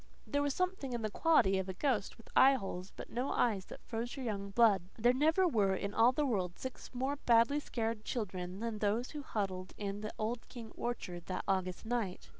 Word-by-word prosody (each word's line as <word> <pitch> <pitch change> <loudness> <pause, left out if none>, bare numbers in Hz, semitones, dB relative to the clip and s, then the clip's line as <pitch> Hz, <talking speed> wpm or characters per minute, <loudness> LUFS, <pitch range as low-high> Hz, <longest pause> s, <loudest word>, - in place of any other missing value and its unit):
There 285 -1 0
was 285 -2 0
something 365 -8 -1
in 235 -2 -2
the 215 - -1
quality 200 - +4
of 190 0 -3
a 190 - -4
ghost 235 -5 0
with 230 - -17
eyeholes 195 -9 +4
but - - -9
no 250 +4 -1
eyes 205 -6 +1
that - - -11
froze 235 +3 -4
our 265 - -4
young 200 -4 -3
blood. 210 -2 +5 0.2
There 240 +2 +4
never 320 +7 +4
were 205 - +2
in 200 +1 -3
all 230 +2 +6
the 295 +3 0
world 185 -9 -1
six 260 -1 -7
more 265 +3 -1
badly 235 +2 +4
scared 225 -5 -3
children 185 -5 -4
than 230 -2 -3
those 215 +4 0
who 300 - -5
huddled 190 -7 -3
in 200 0 -4
the 215 - -4
old 225 +2 -3
King 230 -3 -9
orchard 180 -8 -4
that 185 - -3
August 185 0 -1
night. 225 -6 -2
225 Hz, 210 wpm, -34 LUFS, 195-255 Hz, 0.2 s, all